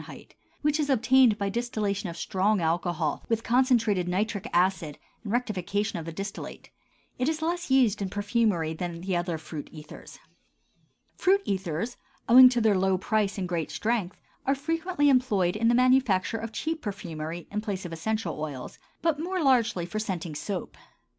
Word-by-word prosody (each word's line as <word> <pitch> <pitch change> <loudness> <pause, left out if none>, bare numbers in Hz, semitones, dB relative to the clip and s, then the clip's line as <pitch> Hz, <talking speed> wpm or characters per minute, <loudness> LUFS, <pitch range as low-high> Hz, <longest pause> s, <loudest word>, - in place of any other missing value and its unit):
which 300 +1 +2
is 295 -1 0
obtained 260 -3 +4
by 200 -2 -1
distillation 205 -3 -2
of 170 - -8
strong 195 +4 +1
alcohol 170 -1 -1
with 225 -1 0
concentrated 235 -7 +2
nitric 200 +2 -1
acid 175 -4 +1 0.3
and 205 - -5
rectification 210 -5 -1
of 160 - -7
the 165 - -5
distillate; 195 +4 -7 0.5
it 255 +4 +1
is 315 0 -2
less 345 0 -2
used 245 -6 +3
in 195 - -2
perfumery 205 -5 0
than 170 0 -5
the 185 0 -2
other 175 -1 -1
fruit 155 -1 -8
ethers. 155 -1 -11 1.0
Fruit 390 +2 +2
ethers, 190 +3 -2 0.3
owing 255 +1 +9
to 245 -1 0
their 220 -3 +3
low 190 0 +2
price 205 +1 0
and 185 -2 -2
great 170 -3 -2
strength, 215 -5 -2 0.3
are 275 - +3
frequently 325 +1 0
employed 210 -9 +2
in 230 +2 +1
the 235 - +4
manufacture 250 -5 +3
of 225 0 -6
cheap 320 +6 -3
perfumery, 170 -5 -6
in 210 +1 -2
place 200 -3 -4
of 170 - -6
essential 175 -1 -3
oils, 140 -5 -6 0.2
but 325 -3 +1
more 360 +1 -2
largely 235 -10 +2
for 195 +5 -4
scenting 180 -6 -4
soap. 180 +5 -5
205 Hz, 165 wpm, -27 LUFS, 175-250 Hz, 1.0 s, owing